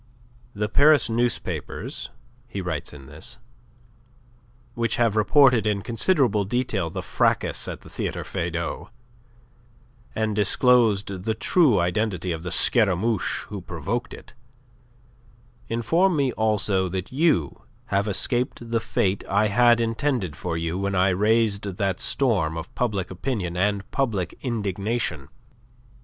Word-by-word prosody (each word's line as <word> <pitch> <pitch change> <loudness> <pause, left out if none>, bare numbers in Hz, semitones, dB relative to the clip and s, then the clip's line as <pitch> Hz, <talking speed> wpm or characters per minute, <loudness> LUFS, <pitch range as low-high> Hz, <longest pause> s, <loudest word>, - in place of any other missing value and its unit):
"The 105 +1 -1
Paris 145 0 +5
newspapers," 120 +1 -2 0.4
he 100 - -6
writes 90 -6 -3
in 70 -2 -12
this, - - -6 1.4
"which 115 0 0
have 115 -3 +1
reported 120 0 +4
in 100 -2 0
considerable 120 - +2
detail 105 -5 -1
the - - -5
fracas - - 0
at - - -6
the - - -14
Theatre - - -3
Feydau 85 +3 -4 1.3
and 110 -1 -1
disclosed 105 -3 +3
the 110 -1 0
true 135 - +3
identity 90 0 -1
of 80 -1 -4
the 90 - -5
Scaramouche 110 -2 +2
who 100 -2 -6
provoked 95 +8 -4
it, - - -15 1.3
inform 165 - +1
me 140 -3 +1
also 105 -4 +1
that 95 0 -4
you 135 - +1 0.3
have 100 +2 +1
escaped 120 +2 -2
the 115 - +2
fate 100 -4 -1
I 105 +2 +2
had 120 +2 +4
intended 115 - -1
for 85 +1 -4
you 85 +2 -2
when 100 0 -1
I 95 +1 +3
raised 105 0 +1
that 95 -3 -1
storm 95 - +1
of 80 - -7
public 105 -8 -2
opinion 95 -3 -3
and 100 +2 0
public 110 -10 -1
indignation. 105 - -2
105 Hz, 125 wpm, -24 LUFS, 95-120 Hz, 1.4 s, Paris